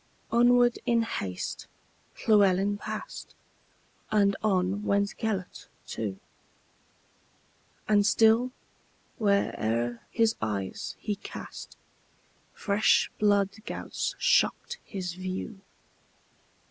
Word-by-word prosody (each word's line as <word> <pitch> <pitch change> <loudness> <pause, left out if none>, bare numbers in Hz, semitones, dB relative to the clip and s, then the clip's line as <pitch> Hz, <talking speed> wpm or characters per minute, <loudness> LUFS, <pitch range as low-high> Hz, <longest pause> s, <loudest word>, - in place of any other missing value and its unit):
Onward, 240 0 +4
in 235 -1 +3
haste, 95 - -4 0.6
Llewelyn 200 -2 +4
passed, - - -7 0.7
And 200 -2 +3
on 195 -1 +1
went 200 0 +1
Gêlert 205 -5 -3 0.2
too; 100 -4 -4 1.7
And 205 -1 +4
still, 225 +4 +4 0.7
where'er 120 - 0
his 225 -1 +2
eyes 100 -4 -3
he 210 -2 -3
cast, - - -9 0.8
Fresh 205 +1 +2
blood 200 -2 +3 0.2
gouts - - -3
shocked 485 +1 +2
his 185 -4 -5
view. 185 +3 -5
200 Hz, 85 wpm, -28 LUFS, 185-220 Hz, 1.7 s, Onward